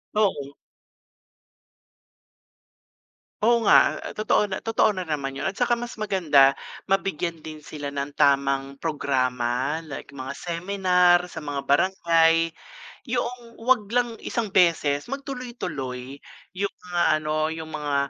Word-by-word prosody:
Oo. 145 -10 0 2.9
Oo 235 +1 +3
nga. - - +5
A - - -7
totoo 215 0 +2
na 190 -2 -5
totoo 220 -1 +2
na 185 - -4
naman 145 -5 -3
'yon. 165 - -2
At 195 - -9
saka 245 -1 +2
mas 240 -1 -4
maganda, 165 -10 +4 0.3
mabigyan 180 -4 -1
din 155 0 -8
sila 150 -1 -7
ng 140 0 -4
tamang 140 -1 +2
programa, 130 -1 -1
like 145 -2 -9
mga 135 0 -6
seminar 180 0 +2
sa 180 - -8
mga 145 -2 -4
barangay. 165 0 +3 0.5
Yoong 240 -1 -3
wag 240 -3 +3
lang 240 -2 +1
isang 225 -3 -2
beses, 165 -6 +2
mag 275 +3 -5
tuloy-tuloy 140 - -6 0.4
'yong 200 +1 -1
mga 175 -1 -2 0.2
ano, 155 +1 -1
'yong 160 -1 -7
mga, 150 -2 -3
165 Hz, 125 wpm, -24 LUFS, 140-205 Hz, 2.9 s, nga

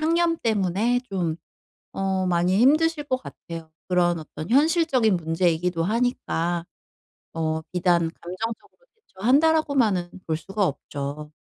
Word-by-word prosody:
상념 335 +1 +2
때문에 215 +2 +1
좀 170 -5 -1 0.6
어 190 -1 0
많이 180 +1 +2
힘드실 300 +4 +3
것 260 -2 0
같아요. 165 -1 -9 0.2
그런 175 -2 +2
어떤 155 +2 -8
현실적인 280 - +3
문제이기도 165 +1 0
하니까 180 -6 -1 0.7
어 160 -1 -1
비단 175 -2 +2
'감정적으로 220 - -6 0.2
대처한다.'라고 295 - +2
만은 195 -9 +2 0.2
볼 160 -1 0
수가 195 +5 -1
없죠. 145 0 -5
190 Hz, 275 characters per minute, -24 LUFS, 170-255 Hz, 0.7 s, 힘드실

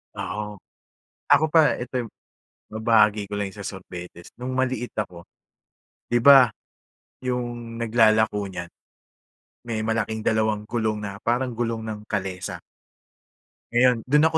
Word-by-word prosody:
Oo. 105 0 -4 0.8
Ako 145 +2 +6
pa, 160 -2 +5
ito 125 +1 -7
yung - - -15 0.6
mabahagi 110 -2 +3
ko - - -7
lang 100 -1 -2
yung 105 - -14
sa 100 - -6
sorbetes. 90 -2 -9
No'ng 125 +1 -4
maliit 130 -2 -1
ako, 90 -5 -5 0.8
'di 120 - +3
ba, 135 -2 +9 0.7
yung 120 -2 -4
naglalako 110 -3 +3
niyan, 85 -2 -7 1.0
may 110 -2 -2
malaking 110 0 -1
dalawang 110 -1 +1
gulong 110 -2 -1
na 100 -1 -6
parang 125 +3 0
gulong 115 -1 -2
ng 110 -1 -5
kalesa 95 -3 -3 1.1
ngayon, 125 +1 +5
do'n 150 +4 +5
ako 160 - +2
110 Hz, 130 wpm, -24 LUFS, 105-120 Hz, 1.1 s, ba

